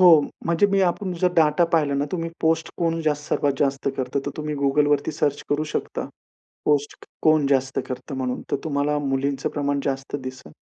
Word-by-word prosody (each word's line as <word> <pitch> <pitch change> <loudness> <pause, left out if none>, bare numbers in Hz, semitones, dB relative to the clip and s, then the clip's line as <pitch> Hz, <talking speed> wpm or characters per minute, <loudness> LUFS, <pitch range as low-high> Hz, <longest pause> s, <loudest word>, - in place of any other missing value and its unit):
हो, 180 - +9 0.4
म्हणजे 170 +4 +3
मी, 195 -1 +2
आपण 185 +1 0
जर 180 -1 +3
डाटा 155 +1 +4
पाहिला 150 -4 +3
ना 140 +1 +1
तुम्ही 165 -2 -2
पोस्ट 160 0 +1
कोण 165 -1 +1
जास्त, 150 -2 0
सर्वात 145 - +2
जास्त 140 -1 +1
करतं, 130 +1 -1
तर - - 0
तुम्ही 150 -1 -3
Googleवरती 145 +1 +2
सर्च 145 -1 0
करू 145 +1 +1
शकता. - - -2 0.6
पोस्ट 145 -1 +1 0.3
कोण 155 -2 +4
जास्त 135 -1 +1
करतं? 130 +2 -5
म्हणून, 125 -1 -2
तर - - +2
तुम्हाला 150 -1 0
मुलींचं 135 -1 -1
प्रमाण 145 -1 0
जास्त 135 0 -2
दिसंल. 130 0 -8
145 Hz, 180 wpm, -24 LUFS, 140-160 Hz, 0.6 s, हो